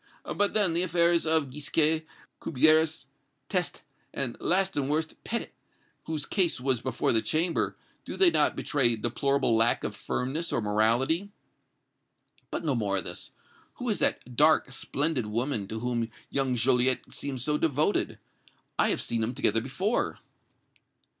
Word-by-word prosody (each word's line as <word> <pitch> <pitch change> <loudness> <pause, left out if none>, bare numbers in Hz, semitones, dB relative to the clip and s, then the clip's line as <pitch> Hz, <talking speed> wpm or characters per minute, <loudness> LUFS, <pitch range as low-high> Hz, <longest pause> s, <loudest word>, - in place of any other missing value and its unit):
But, 205 +1 +1
then, 200 -6 +4
the 170 - +1
affairs 170 -1 +2
of 155 -4 +2
Gisquet, 155 +2 +1 0.3
Cubières, 155 +2 +3 0.4
Teste, - - -1 0.3
and, 130 -4 -3
last 190 +2 +1
and 140 -1 -1
worst, 160 +2 -1
Petit, 235 - -3 0.5
whose 155 -2 -3
case 180 -8 +1
was 130 -2 0
before 130 -2 -1
the 115 - +3
Chamber, 165 +6 0 0.3
do - - -7
they 370 -3 +6
not - - +3
betray 125 -5 +2
deplorable 120 +3 +1
lack 115 +1 +3
of 105 - -4
firmness 135 +10 -3
or - - 0
morality? 115 - +1 1.2
But - - -4
no 145 - +1
more 105 -5 0
of 95 - 0
this. 85 - -6 0.5
Who - - -4
is - - 0
that 125 0 0
dark, 150 -1 +4
splendid 135 -2 -1
woman 115 -1 -1
to 110 +2 -5
whom 120 -2 -2 0.2
young 135 -2 0
Joliette 125 +1 +2
seems 135 -4 -4
so 150 +1 0
devoted? 155 +5 0 0.6
I - - +4
have - - 0
seen 115 -1 -1
them 115 +3 -2
together 115 -4 +2
before!" 185 - -1
140 Hz, 150 wpm, -27 LUFS, 120-160 Hz, 1.2 s, they